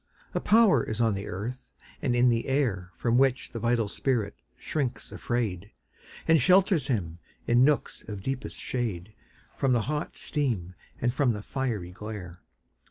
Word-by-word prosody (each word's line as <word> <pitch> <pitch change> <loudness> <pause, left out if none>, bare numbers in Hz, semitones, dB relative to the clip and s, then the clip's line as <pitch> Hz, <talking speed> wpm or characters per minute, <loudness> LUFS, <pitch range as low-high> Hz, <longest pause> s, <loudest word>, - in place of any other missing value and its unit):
A - - +1
power 210 - +5
is 110 0 -4
on 115 -2 +3
the 100 +1 -4
earth 120 +8 -6 0.3
and 125 -4 +1
in 125 +1 +5
the 115 -1 0
air 115 -10 0
From 120 +1 +2
which 130 -2 +2
the 115 - -5
vital 115 -1 +1
spirit 110 -2 0 0.2
shrinks 140 -6 -3
afraid, 105 -6 -2 0.6
And 160 -3 +5
shelters 185 - +4
him, 85 - -2 0.3
in 120 +1 +5
nooks 145 +1 +1
of 100 -2 -6
deepest 135 0 -3
shade, 110 -6 -3 0.4
From 135 -2 +2
the 120 - +3
hot 150 +6 -3
steam 115 - -1 0.3
and 120 0 +1
from 130 -3 +2
the 105 -1 -6
fiery 115 -11 -3
glare. 95 -3 -8
120 Hz, 160 wpm, -28 LUFS, 105-135 Hz, 0.6 s, power